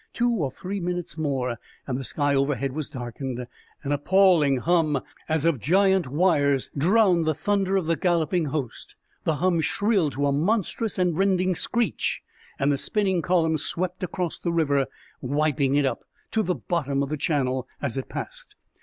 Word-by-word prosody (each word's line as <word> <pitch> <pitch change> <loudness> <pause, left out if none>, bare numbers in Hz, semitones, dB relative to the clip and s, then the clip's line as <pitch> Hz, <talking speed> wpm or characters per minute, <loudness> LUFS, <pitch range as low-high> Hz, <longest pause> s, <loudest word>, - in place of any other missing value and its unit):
Two 240 0 +1
or 170 - 0
three 190 +9 -5
minutes 175 -4 -3
more, 130 -7 -2 0.3
and 130 - -3
the 135 - -3
sky 145 +2 0
overhead 140 -1 0
was 155 0 -4
darkened. 125 -1 -5 0.4
An 140 - -3
appalling 155 -2 +4
hum, 155 0 +2 0.3
as 160 -1 +1
of 165 -6 +2
giant 190 - +3
wires, 145 -3 +2
drowned 175 +1 +3
the 155 - +2
thunder 195 0 +1
of 185 - -1
the 165 +1 +1
galloping 170 +1 +1
host. 140 -4 -5 0.3
The 160 - +2
hum 175 +1 +1
shrilled 195 -2 +1
to 145 +1 -1
a 140 - +2
monstrous 205 +7 0
and 180 -3 +1
rending 185 0 +2
screech, 235 +5 -1 0.3
and 140 +1 +2
the 140 - 0
spinning 190 -4 0
column 160 -2 +2
swept 180 +4 -3
across 180 -1 -3
the 170 - -2
river, 140 -5 +2 0.3
wiping 140 0 +1
it 145 -1 +3
up 135 - -2 0.3
to 220 - +2
the 180 -4 0
bottom 140 -5 -1
of 140 - -4
the 155 - -1
channel 130 -4 0
as 135 -5 -2
it 135 - -4
passed. - - -7
160 Hz, 170 wpm, -25 LUFS, 140-185 Hz, 0.4 s, appalling